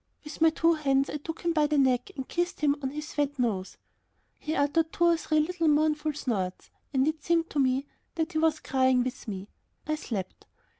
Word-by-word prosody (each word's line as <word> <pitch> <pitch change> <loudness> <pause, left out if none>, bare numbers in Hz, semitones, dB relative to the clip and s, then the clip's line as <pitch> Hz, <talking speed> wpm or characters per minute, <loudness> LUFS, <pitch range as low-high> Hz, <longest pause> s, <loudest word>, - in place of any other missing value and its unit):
With 300 +1 -9
my 325 - +7
two 330 +1 +3
hands 275 -3 +1
I - - -2
took 320 +2 -7
him 340 -1 0
by 305 -2 +3
the 300 0 +1
neck 255 -1 +2
and 265 -2 -5
kissed 350 -2 -2
him 290 -1 +3
on 265 - -1
his 300 +2 -7
wet 290 -1 0
nose. 210 -7 -1 0.6
He 310 +1 -3
uttered 315 +3 +1
two 345 - -1
or 340 0 +6
three 310 0 +1
little 335 +1 -1
mournful 305 0 +2
snorts, 200 -10 -3 0.2
and 265 0 +2
it 310 -1 -2
seemed 335 0 +1
to 290 - -1
me 265 +1 +2 0.3
that 325 0 -1
he 315 - 0
was 315 -1 +2
crying 260 -1 +2
with 255 0 -6
me. 195 -1 -5 0.4
I 310 - -1
slept. 210 - -5
295 Hz, 210 wpm, -28 LUFS, 265-320 Hz, 0.6 s, my